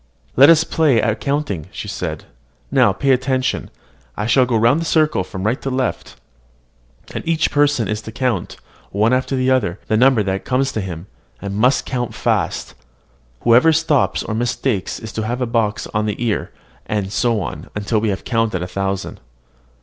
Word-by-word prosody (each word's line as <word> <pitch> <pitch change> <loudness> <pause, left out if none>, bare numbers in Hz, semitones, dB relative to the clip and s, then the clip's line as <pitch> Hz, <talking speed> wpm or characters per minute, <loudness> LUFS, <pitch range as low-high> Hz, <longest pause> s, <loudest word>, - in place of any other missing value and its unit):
"Let 140 +4 +8
us 160 -1 +6
play 150 -8 +2
at 110 0 0
counting," 140 - -2
said - - -6
Charlotte. - - -4 0.5
"Now, - - +4
pay 140 - 0
attention: 130 0 0 0.5
I 105 - -2
shall 125 +2 +4
go 115 -2 +1
round 120 +8 +3
the - - -3
circle 155 - +2
from 95 0 -7
right 115 +5 0
to 135 - -3
left; 130 -1 -2 1.0
and - - -4
each 165 -1 +1
person 145 -5 +2
is 105 0 -2
to 110 - -8
count, 125 +1 -2 0.3
one 105 +5 +2
after 130 +1 0
the 130 0 +1
other, 105 -8 +1
the 110 - +3
number 125 -2 +4
that 95 0 -2
comes 135 +1 0
to 110 - -2
him, 90 -2 -6 0.3
and 100 -1 -5
must 125 +6 +2
count 125 -2 -3
fast; - - -1 0.7
whoever 120 +7 +5
stops 160 -3 +1
or 110 - -4
mistakes 120 -2 -1
is 110 - -8
to 110 - -2
have 120 +2 -2
a 125 - 0
box 115 -3 0
on 105 0 0
the 105 - -1
ear, 110 - -1 0.4
and 100 -2 -2
so 120 -3 +1
on, 90 - -6 0.2
till 110 +1 +1
we 110 - 0
have 95 - -3
counted 115 -7 0
a - - -4
thousand." 95 +1 -3
120 Hz, 185 wpm, -19 LUFS, 105-130 Hz, 1.0 s, Let